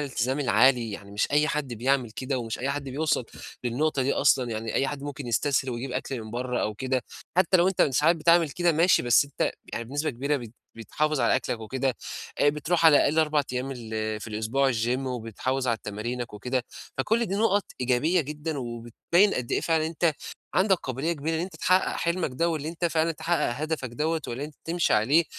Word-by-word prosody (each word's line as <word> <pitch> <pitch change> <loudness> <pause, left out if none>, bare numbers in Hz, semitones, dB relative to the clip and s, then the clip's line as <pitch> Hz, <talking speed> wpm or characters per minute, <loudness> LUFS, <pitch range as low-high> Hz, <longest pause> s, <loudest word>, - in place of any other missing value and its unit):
الالتزام 130 -1 -1
العالي. 125 -2 +3
يعني 100 0 -8
مش 105 +1 0
أي 150 +1 +3
حد 150 -6 -2
بيعمل 125 +1 +1
كده، 130 +4 -3
ومش 115 -2 -4
أي 135 +2 -1
حد 140 0 -3
بيوصل 145 -1 0 0.4
للنُقطة 135 +4 0
دي 135 +2 +1
أصلًا. 130 -3 +3
يعني 110 0 -4
أي 135 - +2
حد 140 0 -5
ممكن 145 -2 -6
يستسهل 130 +2 +1
ويجيب 125 +2 -4
أكل 130 -3 -3
من 110 - -9
برّه 125 +2 -2
أو 105 - -2
كده. 130 +3 -1 0.4
حتّى 185 0 +5
لو 175 +1 +4
أنت 190 - +2
ساعات 150 +5 +3
بتعمل 165 0 +4
كده 175 +4 +2
ماشي، 170 +4 +4
بس 120 +3 +5
أنت 140 - -2 0.2
يعني 115 - -3
بنسبة 145 +6 -2
كبيرة 140 +4 -1
بت 120 -5 -8 0.2
بتحافظ 150 +6 -1
على - - +3
أكلك 115 - -3
وكده. 130 +2 -2 0.4
آآ 145 - +4
بتروح 150 +4 0
على 155 -2 +8
الأقل 150 +2 +3
4 150 -2 +3
أيام 130 +2 -2
ال 110 -3 -4
في - - -7
الأسبوع 110 +6 +1
الgym 120 +2 0
وبتحافظ 130 +1 -3
على 115 -1 +1
تمارينك 115 +3 -4
وكده. 125 +4 -2 0.3
فكل 225 - +1
دي 195 - -2
نُقَط 205 -1 +2 0.2
إيجابية 130 +8 +2
جدًا، 150 +1 -4
وبتبيّن 120 - +1
قد 125 -2 -3
إيه - - +2
فعلًا 160 -1 +1
أنت 165 0 +1 0.4
عندك 190 +1 +4
قابلية 135 +2 -2
كبيرة 160 +1 -2
أن - - -1
أنت 180 -1 -5
تحقّق 185 +3 +2
حلمك 170 -2 -1
ده، 170 +7 +1
واللي 155 -2 -2
أنت 170 +1 -4
فعلًا 165 0 +2
تتحقّق 170 -1 0
هدفك 155 -1 -3
دوّة 155 +6 -1
واللي 125 +4 -4
أنت 150 0 -10
تمشي 170 +1 +1
عليه. 140 +10 +4
135 Hz, 200 wpm, -26 LUFS, 120-160 Hz, 0.4 s, على